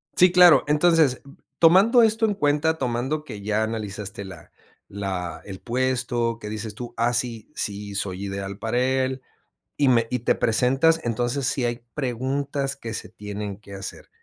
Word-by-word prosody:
Sí, 180 0 +6
claro. 180 -2 +7
Entonces, 150 -2 +3 0.4
tomando 195 +9 +6
esto 225 0 +3
en 210 -2 0
cuenta. 150 0 +1
Tomando 130 +3 -2
que 105 -9 -9
ya 105 +2 0
analizaste 105 -2 -5
la 90 -5 -12 0.4
la 95 -4 -5
el 95 -2 -8
puesto, 120 -2 -1
que 105 - -7
dices 110 0 -5
tú: 120 +1 -7
"Ah, 120 +1 +1
sí. 120 0 -2
Sí 100 0 -3
soy 100 0 -3
ideal 100 0 -5
para 115 +2 -2
él", 130 0 0 0.6
y 140 - +3
me 115 -2 +3
y 125 - -1
te 115 - +1
presentas, 135 +8 +2
entonces, 120 +3 -1
sí 135 -2 0
hay 120 0 -3
preguntas 135 +1 -2
que 115 -4 -7
se - - -4
tienen 105 -1 -6
que 100 -1 -14
hacer. 95 -1 -8
120 Hz, 165 wpm, -24 LUFS, 105-140 Hz, 0.6 s, claro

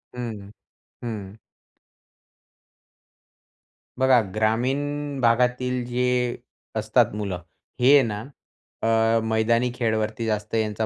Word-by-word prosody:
हं. 110 -5 -6 0.5
हं. 105 -4 -6 2.6
बघा 130 -2 +5
ग्रामीण 135 +6 0
भागातील 125 +1 +2
जे 125 0 0 0.4
असतात - - +2
मुलं. 100 -4 -3 0.4
हे 130 +3 +6
आहे 145 - +8
ना 105 0 -4 0.6
अ, 115 0 +3
मैदानी 110 +2 +2
खेळवरती 110 -2 -1
जास्त 105 0 -2
यांचा 110 0 0
115 Hz, 90 wpm, -24 LUFS, 110-125 Hz, 2.6 s, आहे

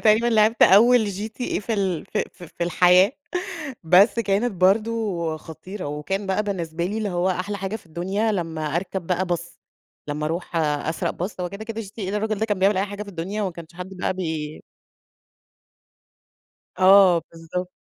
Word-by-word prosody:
تقريبًا 220 +2 +4
لعِبت 225 0 +3
أول 225 +3 +7
GTA 215 +5 -3
في 225 - -3
ال 190 -6 -1 0.3
ف - - -18
في 170 +1 -4
الحياة، 180 +4 +5 0.7
بس 185 +8 +5
كانت 215 +2 +1
برضه 195 -3 +1
خطيرة. 180 +4 -8
وكان 150 +8 -3
بقى 190 +2 +1
بالنسبة 170 -5 -3
لي، 205 +5 -2
اللي 215 -2 -1
هو 180 0 0
أحلى 185 +3 -2
حاجة 195 +2 -3
في 205 - -19
الدنيا، 190 +7 -1
لمّا 160 -5 -2
أركب 185 0 -3
بقى 180 +1 0
bus 175 0 -1 0.7
لمّا 150 +1 -2
أروح 170 +2 -4
أسرق 155 0 0
bus. 205 - -10
هو 180 - -2
كده، 200 +4 -8
كده 225 0 -5
GTA 200 -1 -6
ده 210 - -1
الرجل 215 0 -1
ده 220 - 0
كان 205 -3 -1
بيعمل 195 +1 +3
أي 190 - +2
حاجة 205 +1 -6
في 205 - -10
الدنيا، 195 +3 -4
وما 190 - -2
كانش 165 0 -11
حدّ 180 +2 -8
بقى 180 - -1
بي 160 -4 -4 2.2
آه 185 -2 +7
بالضبط. 165 +2 -5
190 Hz, 170 wpm, -23 LUFS, 170-210 Hz, 2.2 s, أول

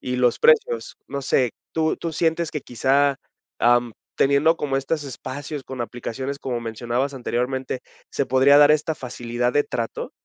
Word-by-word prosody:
y 125 0 -3
los 125 -1 +2
precios, 470 0 +3
no 140 -1 -4
sé, 130 -3 +2 0.2
¿tú 160 -1 +1
tú 165 -1 -4
sientes 165 0 0
que 150 - -4
quizá, 135 +4 +2 0.4
am, 120 -1 +3 0.2
teniendo 140 +4 +3
como 140 -2 -1
estos 145 +3 -2
espacios 140 +2 -6
con 130 -2 -7
aplicaciones, 125 +4 -4
como 125 -4 -3
mencionabas 120 +4 -2
anteriormente, 130 +1 -2 0.3
se 140 - -1
podría 135 +2 +5
dar 145 0 +7
esta 155 +1 +2
facilidad 120 -1 -3
de 145 - +3
trato? 115 -1 -4
135 Hz, 160 wpm, -23 LUFS, 125-145 Hz, 0.4 s, dar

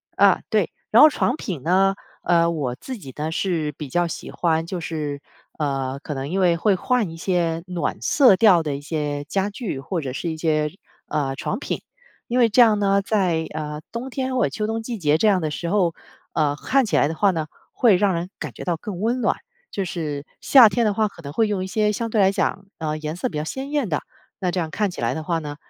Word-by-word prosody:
啊， - - +5
对， - - +2 0.2
然 - - +7
后 305 - +10
床 260 - 0
品 180 - -5
呢， 195 +4 +3 0.3
呃， 170 -1 +3
我 140 -7 -2
自 255 - -7
己 135 -10 -10
呢， 155 +2 -2
是 165 -4 -1
比 145 -1 -8
较 175 +5 +1
喜 - - -6
欢 165 -1 0
就 180 0 -4
是， 150 -3 -4 0.4
呃， 135 -3 -2
可 150 - -4
能 135 0 -4
因 190 +4 -1
为 180 -3 +4
会 200 +3 +3
换 235 0 0
一 165 - -9
些 165 -2 0
暖 175 -5 -3
色 255 -9 +5
调 185 -4 +6
的 150 -3 -2
一 140 - -6
些 145 -1 -3
家 195 +6 -1
具， 205 - -5
或 170 +6 -3
者 135 -5 -4
是 170 - -3
一 160 - -5
些， 155 -2 +1 0.4
呃， 140 -3 -1
床 - - -3
品。 - - -4 0.5
因 245 - -1
为 235 -2 +5
这 235 +4 +5
样 220 -3 +6
呢， 200 -1 +2
在， 185 -6 0
呃， 150 -1 -4
冬 240 +4 -5
天 260 0 -2
或 255 - +2
者 - - +2
秋 210 -1 -3
冬 225 +1 -2
季 235 0 -4
节 150 -3 +3
这 220 - +2
样 195 -3 +3
的 155 - -1
时 170 +3 -4
候， 180 -4 +2 0.4
呃， 145 -2 +1
看 270 - +1
起 210 - -1
来 - - +4
的 160 - -4
话 200 +1 +3
呢， 160 -3 -3 0.3
会 230 -6 +5
让 195 +1 +2
人 170 +1 -3
感 - - -6
觉 - - -8
到 175 -2 -1
更 185 +1 -6
温 240 +4 0
暖， - - +1 0.3
就 195 - -2
是 155 -5 -4 0.2
夏 250 -6 +7
天 235 +2 +1
的 210 - +2
话 215 +1 +2
可 185 -4 -13
能 140 0 -7
会 225 +6 +2
用 200 -3 -1
一 - - -4
些 210 +1 +1
相 230 +2 -3
对 215 - +3
来 195 0 +5
讲， 195 0 -1
呃， 155 -1 -2
颜 155 +1 -4
色 180 - -2
比 150 - -5
较 - - -2
鲜 265 - -5
艳 290 -8 0
的。 150 - 0 0.4
那 180 -2 0
这 180 - -1
样 160 - -2
看 205 +4 -1
起 - - -7
来 - - +1
的 160 - -4
话 165 +1 0
呢， 145 -2 -6
175 Hz, 265 characters per minute, -23 LUFS, 155-210 Hz, 0.5 s, 后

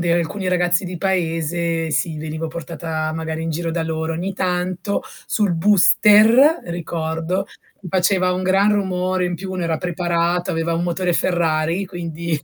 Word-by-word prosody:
de 170 -1 +1
alcuni 180 +3 -2
ragazzi 180 +1 +2
di 180 -1 -5
paese, 165 -2 -1
sì 160 +1 -1
venivo 160 +1 -4
portata 160 -1 -4
magari 160 0 -4
in 165 - -2
giro 165 +1 -2
da 165 0 -1
loro 160 0 -2
ogni 180 +4 -3
tanto 180 +1 -2 0.2
sul 205 -4 +1
booster 210 - +5
ricordo, 170 +2 -3 0.4
faceva 185 0 +2
un 185 +1 -2
gran 195 +3 +3
rumore, 185 -2 0
in 180 - -2
più 190 +1 -6
uno 185 - -3
era 165 -1 0
preparato, 175 0 -1
aveva 165 -1 -1
un 170 - -1
motore 175 +1 0
Ferrari 170 +1 0
quindi, 170 -3 -4
175 Hz, 155 wpm, -20 LUFS, 165-185 Hz, 0.4 s, booster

